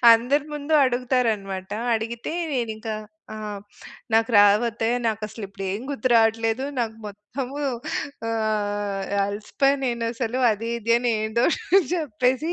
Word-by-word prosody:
అందరి 260 +6 +2
ముందు 295 +1 -4
అడుగుతారనమాట. 230 -7 0 0.2
అడిగితే 230 +5 -3 0.2
నేనింకా 220 -3 -2 0.4
ఆ! - - -6 0.8
నాకు 225 +2 +3
రావత్తయ్య 225 +3 +4
నాకసలిప్పుడేం 205 -2 -4
గుర్తు 270 -2 -1
రావట్లేదు. 225 +2 +3 0.2
నాకు 225 -1 -2
మొత్తము 245 +7 -6 0.7
ఆహ్, 205 -3 -1 0.2
అలిసిపోయా 215 +7 +1
నేనసలు. 235 0 -1
అది 230 +3 -4
ఇది 230 +1 0
అని 240 -1 +1
ఏందో 235 +3 +1 0.5
జెప్పేసి 265 0 0
225 Hz, 100 wpm, -24 LUFS, 210-250 Hz, 0.8 s, రావత్తయ్య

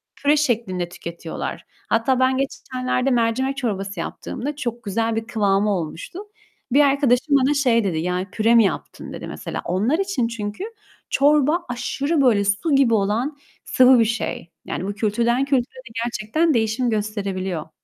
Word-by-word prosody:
püre 290 +1 +2
şeklinde 215 -11 0
tüketiyorlar. 170 -1 -6 0.2
Hatta 240 +3 +2
ben 260 0 +3
geçenlerde 255 -1 -2
mercimek 250 +3 +1
çorbası 195 -7 -3
yaptığımda 285 - -5
çok 240 -4 -4
güzel 225 +2 -1
bir 225 0 -3
kıvamı 205 -2 +1
olmuştu. 170 - -5 0.5
Bir 285 +3 +5
arkadaşım 280 0 +3
bana 275 +2 +3
şey 245 -5 +3
dedi, 185 -5 -1
"Yani 180 +3 -2
püre 225 +2 +3
mi 230 - +7
yaptın?" 195 - -4
dedi - - -7
mesela. - - -5
Onlar 210 - +1
için 385 -12 0
çünkü 215 - -5 0.5
çorba 300 +4 +3
aşırı 280 +5 -1
böyle 215 -6 +3
su 230 - +1
gibi 270 -4 +4
olan 225 +8 0 0.3
sıvı 255 -1 +6
bir 230 - +4
şey. 220 -6 -3
Yani 185 - -4
bu 200 - -2
kültürden 235 +5 +1
kültüre 265 -3 0
de 255 -1 -12
gerçekten 240 +8 0
değişim 230 +1 +1
gösterebiliyor. 195 -6 -3
235 Hz, 150 wpm, -22 LUFS, 205-270 Hz, 0.5 s, mi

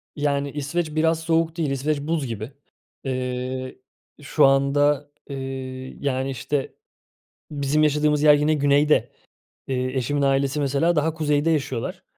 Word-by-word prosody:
Yani 140 -1 -1
İsveç 150 +3 -3
biraz 160 +1 +2
soğuk 165 0 0
değil. 155 -4 0
İsveç 140 +2 -1
buz 155 -2 -1
gibi. 110 +1 -5 0.5
Eee, 130 0 -3 0.4
şu 145 +1 +3
anda, 145 +1 +2 0.2
eee, 130 -1 -6
yani, 135 -1 -1
işte, 135 +2 -3 0.8
bizim 145 0 +1
yaşadığımız 150 0 +2
yer 150 -1 +8
yine 150 +2 +2
güneyde. 145 +1 +3 0.6
Eee, 130 -1 -1
eşimin 145 +3 0
ailesi 135 +1 +1
mesela 145 +5 +1
daha 155 +1 +1
kuzeyde 150 0 +1
yaşıyorlar. 135 -6 -2
145 Hz, 130 wpm, -23 LUFS, 135-150 Hz, 0.8 s, yer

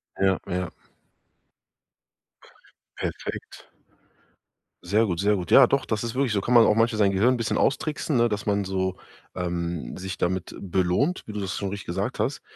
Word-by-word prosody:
Ja, 95 -1 +2
ja. 90 -1 -2 2.3
Perfekt. - - -6 1.2
Sehr 105 +6 +2
gut. 85 -3 -2
Sehr 105 +2 +3
gut. 90 -3 -4
Ja, 135 - +9
doch, 135 +2 0
das 110 0 -2
ist 115 -1 -3
wirklich 130 -3 0
so 100 - +1
kann 120 - -1
man 120 -2 +8
auch 105 - +4
manchmal 115 -1 +2
sein 100 -2 +4
Gehirn 105 +7 +3
'n - - -1
bisschen 115 -1 -1
austricksen, 150 +2 0
ne? 120 0 +3
Dass 105 -1 -3
man 100 -1 +1
so, 95 -1 -1 0.4
ähm, 85 -6 -3
sich 95 0 -5
damit 90 0 -2
belohnt, 95 - 0
wie 105 - -8
du 105 - -4
das 95 -2 -3
schon 100 - -2
richtig 100 0 -7
gesagt - - -3
hast. - - -1
100 Hz, 175 wpm, -25 LUFS, 95-115 Hz, 2.3 s, Ja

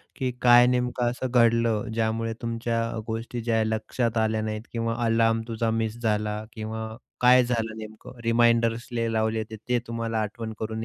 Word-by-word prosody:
की 130 -3 -1
काय 120 0 +7
नेमकं 125 -1 +1
असं 125 0 -4
घडलं, 115 -1 +3
ज्यामुळे 115 0 -1
तुमच्या 115 0 -1
अ, 115 - -5
गोष्टी 115 +1 -4
ज्या 115 0 0
आहे 110 0 +1
लक्षात 115 +1 -1
आल्या 110 0 +1
नाहीत 110 0 -3
किंवा 115 -1 -1
अलार्म 115 0 +3
तुझा 115 0 -1
मिस 110 +1 -3
झाला 105 -1 -1
किंवा 110 0 -5 0.3
काय 125 0 +7
झालं 115 -2 -2
नेमकं 110 +3 -10
रिमाइंडर्स 115 0 +3
लय 115 -1 -1
लावले 110 0 0
होते, 110 0 -5
ते 125 -1 +3
तुम्हाला 115 -1 -2
आठवण 110 +1 -5
करून 110 0 -3
115 Hz, 170 wpm, -26 LUFS, 110-120 Hz, 0.3 s, काय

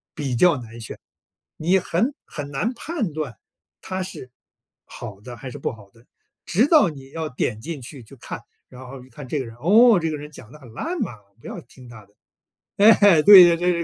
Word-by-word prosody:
比 140 -5 -3
较 175 +1 +4
难 115 -2 -11
选， 110 - -8 0.6
你 175 +5 +2
很 190 - -1
很 145 -2 -7
难 170 - -2
判 250 - -4
断 145 -8 -5 0.4
它 190 0 -5
是 130 -8 -10 0.5
好 105 -5 -10
的 120 +2 -10
还 130 -2 -9
是 - - -9
不 - - -3
好 100 -3 -16
的。 115 +3 -24 0.4
直 205 +10 +2
到 300 - +5
你 135 -3 -12
要 160 0 -4
点 120 -4 -3
进 155 +1 -7
去 130 +1 -9
去 115 +5 -16
看， - - -8 0.3
然 130 0 -12
后 130 -1 -10
一 - - -21
看 145 0 -11
这 150 - -3
个 130 - -4
人， 115 -1 -11
“哦， 215 - +5
这 165 -1 -2
个 - - -3
人 150 +1 -10
讲 115 - -14
的 150 - -14
很 125 -5 -15
烂 335 - -4
嘛， 210 - -2 0.3
不 - - -12
要 - - -7
听 125 0 -17
他 110 -3 -13
的。” 100 - -32 0.6
哎， 205 -5 +6
对 195 0 +10
这 170 -1 +4
这 180 +1 +1
150 Hz, 230 characters per minute, -22 LUFS, 125-185 Hz, 0.6 s, 对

